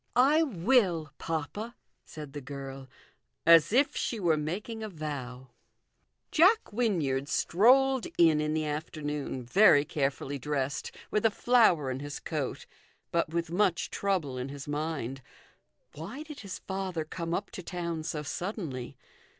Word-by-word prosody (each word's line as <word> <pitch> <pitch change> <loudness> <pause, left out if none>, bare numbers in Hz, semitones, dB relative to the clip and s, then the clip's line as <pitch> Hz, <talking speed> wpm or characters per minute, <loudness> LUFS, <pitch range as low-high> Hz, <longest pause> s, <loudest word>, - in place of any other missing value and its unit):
" - - -41 0.2
I 320 - +5
will, 185 - +2
papa," 165 +9 -4 0.3
said 150 -3 -9
the 145 - -6
girl, 135 0 -8 0.6
as 165 0 +7
if 270 +5 +3
she 230 - -2
were 170 -5 +3
making 190 +9 -4
a 215 - -4
vow. 130 -6 -6 0.8
Jack 375 - +4
Wynyard 155 - 0
strolled 260 +6 +4
in 160 -3 +5
in 150 0 -1
the 155 -1 0
afternoon, 150 -3 -4
very 145 - +5
carefully 140 -1 -2
dressed, 140 0 -2 0.2
with 210 - +1
a 225 - +5
flower 205 - +3
in 130 - -4
his 145 +1 -6
coat, 150 -5 -4 0.5
but 170 -2 +1
with 165 0 -2
much 180 -1 +1
trouble 170 -10 -1
in 125 +2 -4
his 140 0 -8
mind. 145 -4 -3 0.7
Why 205 - -7
did 300 -2 -10
his 195 -3 -6
father 190 -4 -4
come 170 +1 -3
up 200 - -4
to - - -7
town 170 -2 -4
so 155 -1 -4
suddenly 155 - -5
160 Hz, 145 wpm, -29 LUFS, 145-200 Hz, 0.8 s, as